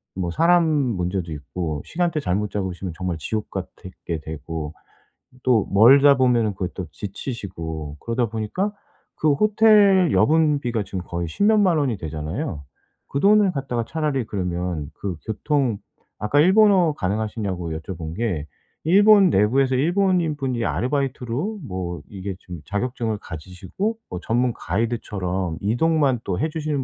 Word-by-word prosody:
뭐 90 -2 -2
사람 170 - +4
문제도 95 - -1
있고 75 0 -4
시간대 170 -2 -1
잘못 105 -4 -1
잡으시면 95 -3 -4
정말 90 -3 -2
지옥 105 +7 -3
같애 95 -1 -7
게 85 -2 -2
되고 80 0 -6 0.7
또 120 -5 +3
멀다 135 +7 +7
보면은 120 -5 +2
그 95 -2 -3
또 95 - -5
지치시고 85 - -6
그러다 115 +1 -1
보니까 115 - -2 0.4
그 155 -2 +2
호텔 205 -1 +5
여분 155 -1 +3
비가 120 -5 -2
지금 95 -1 -5
거의 85 0 -3
10 80 - -2
몇 220 0 +5
만 185 -5 +3
원이 130 -8 0
되잖아요. 80 - -4 0.4
그 140 - -2
돈을 205 +2 +5
갖다가 130 -6 -3
차라리 150 -5 -1
그러면 90 -6 -3
그 95 -2 -5
교통 125 +1 0 0.4
아까 105 +7 +1
일본어 190 -2 +5
가능하시냐고 100 - -3
여쭤본 80 0 -6
게 100 -11 -1 0.4
일본 200 +2 +6
내부에서 130 +6 +3
일본인 175 +2 +2
분이 130 -4 -2
아르바이트로 140 - -2
뭐 90 -3 -4
이게 95 -1 -6
좀 90 -4 -9
자격증을 110 +1 -2
가지시고 95 - -5
뭐 90 - -5
전문 120 +1 +1
가이드처럼 95 -4 -2
이동만 135 +4 +2
또 90 - -2
해 155 - 0
주시는 150 -3 -2
115 Hz, 310 characters per minute, -23 LUFS, 90-150 Hz, 0.7 s, 멀다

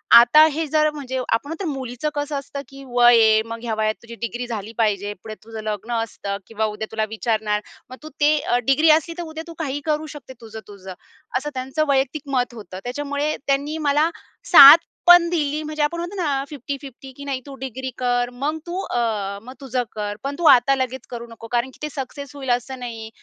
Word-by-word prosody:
आता 240 +6 +8
हे 320 +1 -1
जर 305 +1 +3
म्हणजे 260 -3 -5
आपण 250 +1 -1
म्हणतो 330 +3 -5
ना - - -1
मुलीचं 260 +2 -4
कसं 290 0 -2
असतं, 280 +1 -7
की 275 0 -12
वय 240 -1 +6
आहे. 220 0 +5
मग 230 0 -6
ह्या 225 -2 -2
वयात 215 0 +1
तुझी 235 0 -10
डिग्री 240 +2 -3
झाली 220 -2 -5
पाहिजे. 205 -2 0
पुढे 220 -1 -7
तुझं 220 -1 -8
लग्न 215 +2 -4
असतं 200 -3 -5
किंवा 220 -1 -2
उद्या 220 +1 -5
तुला 220 -1 -1
विचारणार. 220 -2 -1 0.3
मग 255 - -10
तू 310 - -8
ते 300 +1 +5
अ, 245 - 0
डिग्री 305 +4 +4
असली, 335 +2 -5
तर 345 - -4
उद्या 320 0 -7
तू 335 - -8
काहीही 290 -2 -3
करू 305 0 0
शकते 275 -3 -11
तुझं-तुझं. 205 -4 -10 0.4
असं 295 +3 -3
त्यांचं 265 +4 -1
वैयक्तिक 270 +2 +1
मत 245 -1 0
होतं. 195 -5 -9
त्याच्यामुळे 285 +4 -2
त्यांनी 285 +3 0
मला 300 +3 +3 0.4
साथ 295 -1 +12 0.3
पण 350 -1 +8
दिली. 305 -3 -1
म्हणजे 305 0 -2
आपण 340 +3 -1
म्हणतो 350 +4 -5
ना 285 -4 0
अ, - - -4
50-50 275 -1 -8
की 280 - -8
नाही 270 -2 -3
तू 275 -1 -9
डिग्री 260 +1 -5
कर, 245 -1 0
मग 295 +5 -2
तू 360 +2 -3
अ, 210 -4 -2
मग 255 - -10
तुझं 255 -2 -1
कर. 205 -1 -3
पण 280 +1 -3
तू 340 - -1
आता 260 +3 +2
लगेच 260 -1 -4
करू 235 0 -6
नको. 230 0 -11
कारण 240 +2 0
की - - -20
ते 300 - -2
सक्सेस 280 +1 -7
होईल 265 -2 -6
असं 260 +1 -9
नाही 225 -3 -7
260 Hz, 210 wpm, -22 LUFS, 230-290 Hz, 0.4 s, साथ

